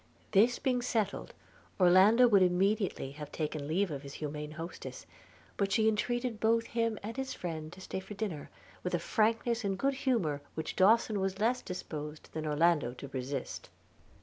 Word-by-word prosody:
This 225 +4 +5
being 250 -2 0
settled, 220 -5 -2 0.4
Orlando 195 +7 +7
would 205 -4 +5
immediately 185 -4 +1
have 150 0 -8
taken 150 -2 -3
leave 180 +4 +1
of 140 -2 -4
his 140 -1 -9
humane 150 0 -5
hostess; 165 +2 -7 0.5
but 200 -1 0
she 220 +2 +3
entreated 240 +1 0
both 230 +1 +2
him 230 -2 -1
and 225 +3 -5
his 265 0 -3
friend 160 -3 -5
to 190 - -12
stay 190 - -4
dinner, 195 -5 -5 0.3
with 180 -1 -1
a - - 0
frankness 225 +3 +1
and 195 -1 -1
good 275 +6 +1
humour 225 - 0
which 160 - -4
Dawson 215 +2 +4
was 190 0 -1
less 240 +4 +1
disposed 155 -4 -6
than 155 -1 -3
Orlando 150 -4 +2
to 140 +2 -8
resist. 135 0 -5
190 Hz, 165 wpm, -32 LUFS, 155-225 Hz, 0.5 s, Orlando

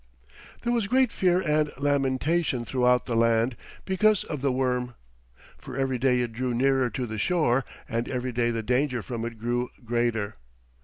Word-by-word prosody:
There 240 - +1
was 230 -4 +1
great 255 +1 +3
fear 180 -1 +2
and 150 -2 +1
lamentation 140 0 +1
throughout 125 0 +2
the 120 - -2
land 115 +1 +2 0.3
because 210 +3 +3
of 150 -4 -5
the 140 -1 +1
worm, 125 -1 -1 0.6
for - - -8
every 135 -2 0
day 125 -1 +3
it 120 -2 -3
drew 125 +1 -2
nearer 135 0 +2
to 125 +3 -3
the 110 -2 -5
shore, 135 - +2 0.2
and 115 +1 -2
every 130 0 -2
day 120 0 +1
the 115 -1 -2
danger 125 0 0
from 115 +4 -5
it 115 -1 -6
grew 120 +2 -1 0.2
greater. 115 - -1
125 Hz, 170 wpm, -26 LUFS, 120-145 Hz, 0.6 s, great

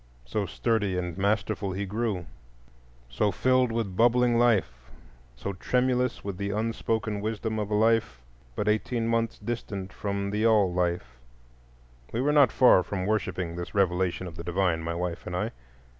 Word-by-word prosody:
So 100 +11 -2
sturdy 105 -5 0
and 90 -2 -3
masterful 100 0 0
he 100 +2 -3
grew, 105 -3 -2 0.8
so 65 - 0
filled 130 0 +2
with 110 -5 -2
bubbling 120 +2 +4
life, 80 - +1 0.5
so 100 +11 -4
tremulous 125 +5 0
with 100 -2 -5
the 100 +1 -3
unspoken 110 0 -1
wisdom 110 +1 -2
of 105 -1 -2
a 105 - 0
life 110 - +2 0.4
but 105 - -2
eighteen 115 +2 0
months 115 0 0
distant 100 -5 -5
from 100 0 -3
the 105 +1 -1
All 105 -5 +4
life,—we - - -6
were 145 +3 +2
not 145 -3 +6
far 125 -7 +6
from 95 0 -3
worshipping 95 -5 -1
this 85 +2 -6
revelation 95 -1 +1
of 85 -1 -9
the 85 - -6
divine, 85 -1 0
my 85 +1 -3
wife 90 0 -4
and 90 - -4
I. - - -1
100 Hz, 160 wpm, -27 LUFS, 90-115 Hz, 0.8 s, not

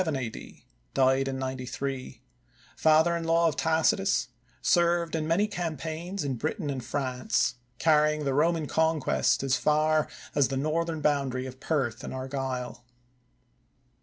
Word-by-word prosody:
diedin 135 0 +2
93; 130 0 -5 0.5
father 160 +2 +4
in 170 - -3
law 165 +1 +3
of 160 - 0
Tacitus; 160 -2 +2 0.3
served 170 -1 +2
in 155 -1 -1
many 170 +6 +3
campaigns 170 0 -4
in 135 -3 -2
Britain 155 - -2
and 130 -3 -4
France, 130 -2 0 0.2
carrying 150 0 +3
the 135 - +1
Roman 160 +2 +2
conquest 160 -2 +1
as 130 -1 +2
far 155 0 +2 0.3
as 140 -3 +3
the 135 - -3
northern 160 +2 -1
boundary 135 -4 0
of 130 0 -9
Perth 130 -7 -1
and - - -5
Argyll. 130 -2 -4
150 Hz, 125 wpm, -28 LUFS, 130-160 Hz, 0.5 s, father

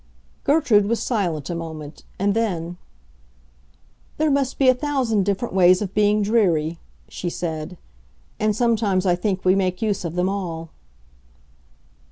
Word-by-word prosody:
Gertrude 265 -9 +3
was 230 +1 0
silent 175 - -1
a - - -3
moment; 160 -2 -8
and 200 +1 +1
then, 175 -6 -2 1.4
"There 310 -1 +2
must 275 -2 0
be 270 - +3
a 255 - +7
thousand 250 -7 0
different 200 +3 -2
ways 185 -1 +5
of 195 -2 -4
being 210 0 +3
dreary," 170 -7 +1 0.3
she 175 - -4
said; 165 0 -5 0.6
"and 215 -1 +1
sometimes 215 -5 +1
I 180 - +4
think 190 0 -2
we 185 - +5
make 185 -2 0
use 205 -3 -1
of 170 -1 -4
them 180 +1 +1
all." 170 -5 -4
195 Hz, 145 wpm, -22 LUFS, 175-220 Hz, 1.4 s, a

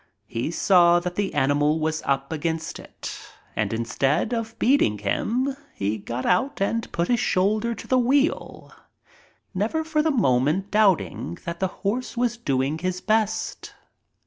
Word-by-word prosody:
He 115 +5 -3
saw 175 0 +5
that 175 0 -4
the 200 +1 -1
animal 145 +3 +2
was 155 0 -1
up 140 +1 0
against 160 +1 -3
it, - - -8 0.4
and - - 0
instead 135 - 0
of 230 -1 -3
beating 240 - +3
him 245 - -1 0.2
he 105 +2 -1
got 120 +5 -5
out 265 +11 +1
and 225 +4 -1
put 170 +1 -1
his 240 -2 +2
shoulder 215 +6 +1
to - - -9
the 255 - +3
wheel, 275 +5 0 0.8
never 220 +12 -1
for 315 -1 +1
the 320 - +1
moment 175 - +2
doubt 205 -4 +5
ing 85 - -6
that 170 0 -4
the 190 - +1 0.2
horse 245 +4 -1
was 240 -1 +1
doing 140 - -1
his 185 +1 -2
best. 215 +1 -1
185 Hz, 155 wpm, -24 LUFS, 145-230 Hz, 0.8 s, saw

